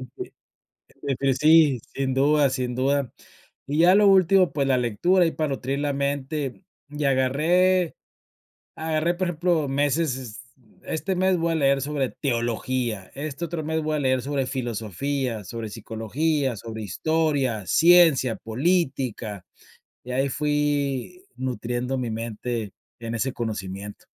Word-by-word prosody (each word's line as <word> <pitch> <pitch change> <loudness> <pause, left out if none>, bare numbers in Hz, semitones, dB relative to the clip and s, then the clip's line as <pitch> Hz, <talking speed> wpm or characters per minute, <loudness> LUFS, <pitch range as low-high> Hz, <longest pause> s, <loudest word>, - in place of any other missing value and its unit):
d - - -7 0.9
defini 135 -1 +3
sí, 150 -3 +5
sin 135 -1 -1
duda, 145 +1 +3
sin 125 -2 -2
duda. 135 0 0 0.5
Y 145 +3 -2
ya 180 +3 +6
lo 205 0 +5
último, 190 -1 +5
pues, 140 -2 0
la 130 - +3
lectura, 150 - +2
ahí 165 - +2
para 155 -2 -2
nutrir 135 +1 -2
la 145 -1 -1
mente, 140 +2 -3 0.3
y 150 0 -3
agarré, 160 +7 +2 0.8
agarré, 160 +2 0
por 185 0 -1
ejemplo, 170 -2 +1
meses, 145 0 +1
es 120 -5 -8 0.4
este 190 +4 -2
mes 185 0 +2
voy 165 0 0
a - - 0
leer 140 -2 +3
sobre 140 -2 -1
teología, 120 -4 -2
este 150 +3 -5
otro 165 -1 -4
mes 160 +1 -1
voy 155 0 -1
a - - -1
leer 130 -2 +2
sobre 140 -1 -1
filosofía, 120 - -3
sobre 115 +3 -6
psicología, 120 +6 -2
sobre 110 +1 -7
historia, 135 - 0
ciencia, 165 - +5
política, 125 - -1 0.6
y 125 - -7
ahí 135 +2 +1
fui 145 - -1
nutriendo 125 0 -3
mi 120 -3 -2
mente, 115 -1 -4 0.3
en 115 0 -4
ese 130 +3 -1
conocimiento. 105 -3 -5
135 Hz, 140 wpm, -24 LUFS, 120-155 Hz, 0.9 s, ya